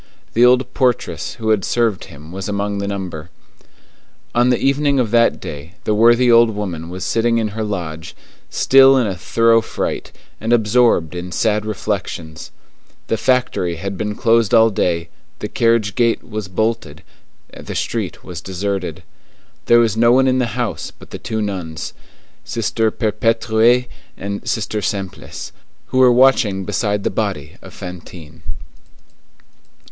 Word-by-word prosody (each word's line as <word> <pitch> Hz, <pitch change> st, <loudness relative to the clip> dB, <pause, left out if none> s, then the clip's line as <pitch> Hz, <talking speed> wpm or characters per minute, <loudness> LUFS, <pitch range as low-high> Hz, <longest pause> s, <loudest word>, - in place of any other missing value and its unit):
The 120 Hz, -, +4 dB
old 125 Hz, +1 st, +4 dB
portress 120 Hz, -, -1 dB
who 110 Hz, -2 st, -3 dB
had 105 Hz, -3 st, +2 dB
served 115 Hz, -4 st, 0 dB
him 75 Hz, +3 st, -13 dB
was 95 Hz, +2 st, -5 dB
among 100 Hz, 0 st, -2 dB
the 100 Hz, -, -3 dB
number. 90 Hz, -5 st, -5 dB, 1.0 s
On 120 Hz, +1 st, +3 dB
the 125 Hz, -, +3 dB
evening 140 Hz, 0 st, +1 dB
of 115 Hz, -4 st, 0 dB
that 115 Hz, 0 st, +3 dB
day 75 Hz, +5 st, -8 dB
the 105 Hz, -, 0 dB
worthy 120 Hz, +3 st, +5 dB
old 115 Hz, 0 st, +6 dB
woman 90 Hz, -6 st, -5 dB
was 90 Hz, +1 st, -5 dB
sitting 115 Hz, +1 st, +1 dB
in 110 Hz, -2 st, 0 dB
her 110 Hz, +2 st, -4 dB
lodge, 85 Hz, -6 st, -5 dB, 0.3 s
still 135 Hz, 0 st, +6 dB
in 125 Hz, -, +2 dB
a 100 Hz, -3 st, -2 dB
thorough 115 Hz, +5 st, +3 dB
fright, -, -, -4 dB, 0.3 s
and 115 Hz, +2 st, -3 dB
absorbed 110 Hz, -8 st, +3 dB
in 90 Hz, 0 st, -6 dB
sad 105 Hz, +1 st, 0 dB
reflections. 80 Hz, -6 st, -4 dB, 0.6 s
The -, -, +2 dB
factory 125 Hz, -9 st, 0 dB
had 95 Hz, +4 st, -5 dB
been 105 Hz, +2 st, -3 dB
closed 115 Hz, -2 st, +3 dB
all 115 Hz, 0 st, +5 dB
day, 85 Hz, -3 st, -1 dB, 0.3 s
the -, -, -5 dB
carriage 115 Hz, -3 st, +1 dB
gate 115 Hz, -1 st, +1 dB
was 105 Hz, -3 st, -5 dB
bolted, 110 Hz, -5 st, -2 dB, 0.5 s
the -, -, -8 dB
street -, -, -3 dB
was 90 Hz, -2 st, -7 dB
deserted. 95 Hz, -3 st, -4 dB, 0.6 s
There 120 Hz, -, +6 dB
was 115 Hz, -3 st, +3 dB
no 115 Hz, +1 st, +4 dB
one 130 Hz, +1 st, +4 dB
in 130 Hz, 0 st, +2 dB
the 120 Hz, -3 st, -2 dB
house -, -, -2 dB
but -, -, -16 dB
the -, -, -7 dB
two 110 Hz, -1 st, -3 dB
nuns, 90 Hz, -6 st, -5 dB, 0.5 s
Sister 115 Hz, -1 st, 0 dB
Perpétue 115 Hz, +2 st, +2 dB, 0.3 s
and 100 Hz, +1 st, -5 dB
Sister 110 Hz, -1 st, -2 dB
Simplice, 95 Hz, -1 st, -5 dB, 0.4 s
who 130 Hz, -, 0 dB
were 130 Hz, -1 st, +7 dB
watching 120 Hz, -6 st, +3 dB
beside 105 Hz, -1 st, -1 dB
the -, -, 0 dB
body 95 Hz, -8 st, -3 dB
of -, -, -12 dB
Fantine. 90 Hz, -3 st, -10 dB
110 Hz, 150 wpm, -18 LUFS, 95-115 Hz, 1.0 s, were